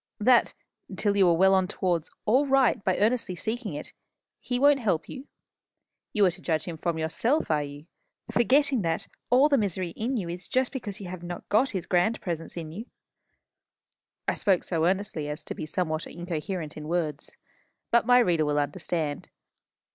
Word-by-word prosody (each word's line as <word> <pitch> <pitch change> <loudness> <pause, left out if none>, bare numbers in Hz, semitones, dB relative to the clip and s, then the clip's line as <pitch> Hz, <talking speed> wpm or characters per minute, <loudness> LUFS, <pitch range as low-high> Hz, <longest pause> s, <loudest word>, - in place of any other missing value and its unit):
that, 240 +3 +4 0.4
till 205 -2 +1
you 190 -3 +5
are 170 - +4
well 190 +2 +5
on 190 -1 +3
towards 175 -5 -1 0.2
all 260 +7 +3
right 265 -6 +3
by 185 - +1
earnestly 215 -3 +1
seeking 220 - -3
it, 150 - -7 0.5
he 245 - -2
won't 285 +2 +5
help 190 -10 0
you? 270 0 -9 0.8
You 210 -2 +3
are 180 - +4
to 180 +2 -12
judge 160 -3 0
him 170 - -5
from 170 -1 -1
yourself, 165 - 0
are 150 -1 +2
you? 145 +1 -8 0.5
forgetting 265 +1 +3
that 165 -2 -1 0.2
all 260 +4 +6
the 280 -3 +3
misery 185 -4 -1
in 240 +8 -2
you 190 -6 -3
is 175 +2 -7
just 255 0 +1
because 220 -7 -6
you 195 - -7
have 180 -1 -7
not 175 0 -7
got 245 +6 +3
his 185 -5 -3
grand 180 +5 +2
presence 165 -3 -5
with 160 -3 -6
you?" 215 +9 -7 1.4
I - - +2
spoke 190 -4 +2
so 165 -2 0
earnestly 190 -5 -1
as 150 +2 -5
to - - -5
be 155 - -6
somewhat 155 -1 -2
incoherent 175 -1 -5
in 150 0 -7
words. 155 -4 -3 0.5
But 235 -1 +3
my 245 0 +7
reader 175 -10 +3
will 150 -1 0
understand. 145 +1 -2
185 Hz, 185 wpm, -27 LUFS, 165-230 Hz, 1.4 s, my